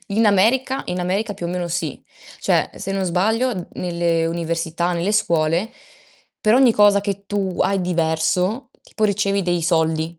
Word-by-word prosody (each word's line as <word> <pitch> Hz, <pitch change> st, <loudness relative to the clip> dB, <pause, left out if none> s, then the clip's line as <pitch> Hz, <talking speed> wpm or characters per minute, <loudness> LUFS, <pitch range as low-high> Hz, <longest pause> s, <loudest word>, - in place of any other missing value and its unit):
In 220 Hz, +2 st, +2 dB
America 235 Hz, +7 st, +2 dB
in 180 Hz, -, -3 dB
America 195 Hz, +5 st, -1 dB
più 175 Hz, -, -5 dB
o -, -, -4 dB
meno 175 Hz, 0 st, -3 dB
sì. 165 Hz, -4 st, -3 dB, 0.4 s
Cioè -, -, +1 dB
se 195 Hz, -, -6 dB
non 195 Hz, -1 st, -1 dB
sbaglio 200 Hz, +3 st, 0 dB
nelle 170 Hz, -2 st, 0 dB
università, 170 Hz, +1 st, -2 dB
nelle 175 Hz, +4 st, -1 dB
scuole 170 Hz, 0 st, +1 dB, 0.7 s
per 215 Hz, +1 st, +3 dB
ogni 255 Hz, -2 st, +5 dB
cosa 205 Hz, -1 st, +5 dB
che 200 Hz, 0 st, -4 dB
tu 195 Hz, -3 st, -2 dB
hai 195 Hz, +1 st, +1 dB
diverso, 180 Hz, +6 st, 0 dB
tipo 220 Hz, -, -3 dB
ricevi 200 Hz, -1 st, +1 dB
dei 175 Hz, -1 st, -1 dB
soldi. 160 Hz, 0 st, 0 dB
180 Hz, 160 wpm, -20 LUFS, 170-205 Hz, 0.7 s, ogni